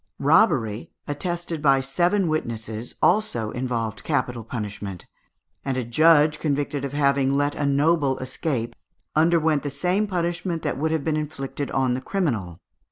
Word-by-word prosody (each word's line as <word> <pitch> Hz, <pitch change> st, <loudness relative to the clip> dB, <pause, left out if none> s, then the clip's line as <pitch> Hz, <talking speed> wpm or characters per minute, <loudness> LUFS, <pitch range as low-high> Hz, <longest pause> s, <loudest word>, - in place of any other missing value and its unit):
Robbery, 140 Hz, -, +2 dB, 0.2 s
attested 170 Hz, +2 st, -3 dB
by 135 Hz, -2 st, +4 dB
seven 175 Hz, +8 st, +1 dB
witnesses, 115 Hz, -6 st, -3 dB
also 170 Hz, -, +2 dB
involved 115 Hz, -4 st, -3 dB
capital 125 Hz, -6 st, -1 dB
punishment, 105 Hz, -5 st, -5 dB, 0.6 s
and 135 Hz, -2 st, -2 dB
a 130 Hz, -, 0 dB
judge 150 Hz, +4 st, +4 dB
convicted 145 Hz, -2 st, -1 dB
of 140 Hz, 0 st, -4 dB
having 140 Hz, -2 st, +2 dB
let 145 Hz, +1 st, +1 dB
a 145 Hz, -, -1 dB
noble 140 Hz, -1 st, +2 dB
escape, 130 Hz, -2 st, -3 dB, 0.4 s
underwent 160 Hz, -2 st, +3 dB
the 145 Hz, -, -3 dB
same 180 Hz, +9 st, 0 dB
punishment 175 Hz, -2 st, -2 dB
that -, -, -2 dB
would 160 Hz, +2 st, +1 dB
have 160 Hz, -2 st, -1 dB
been 155 Hz, 0 st, 0 dB
inflicted 145 Hz, -2 st, -4 dB
on 130 Hz, -2 st, +1 dB
the 130 Hz, -, -2 dB
criminal. 120 Hz, -, -2 dB
145 Hz, 145 wpm, -24 LUFS, 125-160 Hz, 0.6 s, by